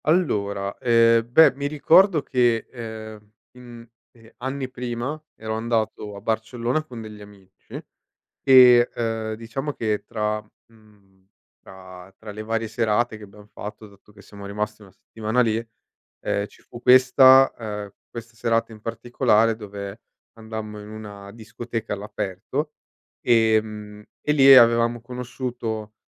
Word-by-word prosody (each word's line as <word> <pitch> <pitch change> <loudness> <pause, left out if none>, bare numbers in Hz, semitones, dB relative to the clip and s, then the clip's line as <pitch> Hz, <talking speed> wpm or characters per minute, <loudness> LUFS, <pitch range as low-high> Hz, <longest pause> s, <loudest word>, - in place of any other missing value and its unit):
Allora, 100 - 0
ehm, 115 -1 +3
beh 160 +3 +7
mi 140 +2 -3
ricordo 160 +3 +4
che, 120 -3 +1
ehm, 110 -3 -9 0.2
mhmm, 120 -2 -13 0.3
ehm, 115 -1 -18
anni 130 +1 -4
prima 125 +4 -5
ero 110 0 -5
andato 110 -2 -2
a 100 - -10
Barcellona 115 +6 -2
con 125 -7 -10
degli 105 -1 -10
amici 100 -2 -13 0.6
e, 125 -2 +7
uhm, 115 -1 -2
diciamo 115 +6 -5
che 110 -4 -2
tra 105 -1 -2 0.3
mhmm, 100 -4 -25 0.3
tra 95 0 -13
tra 110 -1 -10
le 105 +1 -7
varie 115 0 -2
serate 115 0 0
che 105 - -13
abbiam 105 +1 -15
fatto, 105 +1 -9
dato 100 +1 -21
che 100 - -16
siamo 100 0 -12
rimasti 105 +1 -5
1 95 - -17
settimana 110 +4 -2
lì, 110 -2 +1 0.7
ehm, 100 0 -1
ci - - -22
fu 120 - -13
questa 130 +1 +6
uhm, 105 -3 -6 0.2
questa 115 0 -10
serata 115 0 0
in 110 - -12
particolare 115 -1 +1
dove 100 -1 -8 0.4
andammo 110 -1 -7
in 105 0 -11
una 105 -2 -10
discoteca 115 0 -7
all'aperto, 105 - -4 0.5
ehm, 110 -2 +1 0.2
e 150 - 0
lì 135 -2 +8
avevamo 115 -1 +5
conosciuto 120 -3 -6
110 Hz, 135 wpm, -23 LUFS, 105-120 Hz, 0.7 s, lì